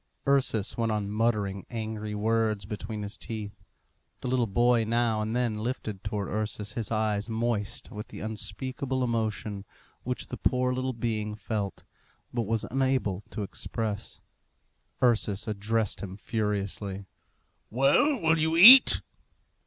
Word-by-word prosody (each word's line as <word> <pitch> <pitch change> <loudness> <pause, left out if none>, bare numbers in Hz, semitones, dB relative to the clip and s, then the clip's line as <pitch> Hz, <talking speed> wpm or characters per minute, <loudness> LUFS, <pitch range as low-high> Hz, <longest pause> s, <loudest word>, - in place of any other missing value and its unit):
Ursus 130 -7 +1
went 115 -1 0
on 105 -1 -2
muttering 105 -3 0
angry 110 -2 -4
words 110 -1 0
between 105 0 -5
his 100 0 -4
teeth. 110 -3 -6 0.6
The - - -4
little 125 -2 +2
boy 120 +3 +3
now 115 -1 +1
and 110 +2 -2
then 120 -4 0
lifted 110 -4 -4
towards 105 -2 -3
Ursus 105 0 -3
his 115 0 -3
eyes 110 -1 0
moist 110 -1 -2
with 105 -1 -7
the - - -9
unspeakable 125 +5 -3
emotion 110 -4 -2 0.4
which 125 0 -3
the 125 - -7
poor 125 0 +1
little 130 +1 -2
being 110 -2 -2
felt, 105 -1 -4 0.5
but 120 -4 -1
was 115 0 0
unable 130 -7 0
to 105 - -4
express. 105 +1 -4 0.8
Ursus 110 -4 +2
addressed 110 0 -1
him 95 -1 -6
furiously. 100 -2 -3 0.6
"Well, 140 - +3
will 165 -2 +3
you 160 +1 +1
eat?" 250 +9 +10
110 Hz, 135 wpm, -28 LUFS, 105-120 Hz, 0.8 s, eat